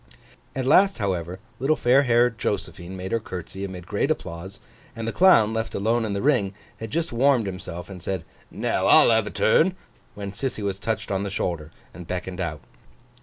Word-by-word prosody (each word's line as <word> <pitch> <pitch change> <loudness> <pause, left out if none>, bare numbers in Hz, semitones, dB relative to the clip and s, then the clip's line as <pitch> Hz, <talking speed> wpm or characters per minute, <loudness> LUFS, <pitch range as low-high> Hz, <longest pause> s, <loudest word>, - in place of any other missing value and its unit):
At 130 -1 -2
last, 195 +8 +5
however, 90 -4 -2 0.2
little 140 +5 +2
fair 130 0 +4
haired 120 -2 +3
Josephine 95 -3 -3
made 95 +1 -5
her 115 - +1
curtsey 95 -2 -7
amid 95 -3 -6
great 105 +9 -1
applause; 95 - -4 0.4
and 115 -1 -5
the - - 0
Clown, 115 - +5
left 110 0 -3
alone 115 +3 +1
in 105 - -2
the 100 - -2
ring, 115 -9 +2 0.2
had 110 - -6
just 165 +3 -2
warmed 125 -1 +3
himself, 90 -2 -6
and 95 -3 -9
said, 95 -2 -3 0.2
'Now - - -1
I'll - - +7
have 110 -2 +3
a - - -2
turn!' 180 +11 +3 0.4
when 100 -1 -5
Sissy 110 +1 -3
was 100 -1 -2
touched 110 -1 -3
on 95 0 0
the 100 - -3
shoulder, 85 -5 -3 0.2
and 85 0 -10
beckoned 90 +1 -4
out. 80 -5 -3
100 Hz, 190 wpm, -24 LUFS, 95-120 Hz, 0.4 s, I'll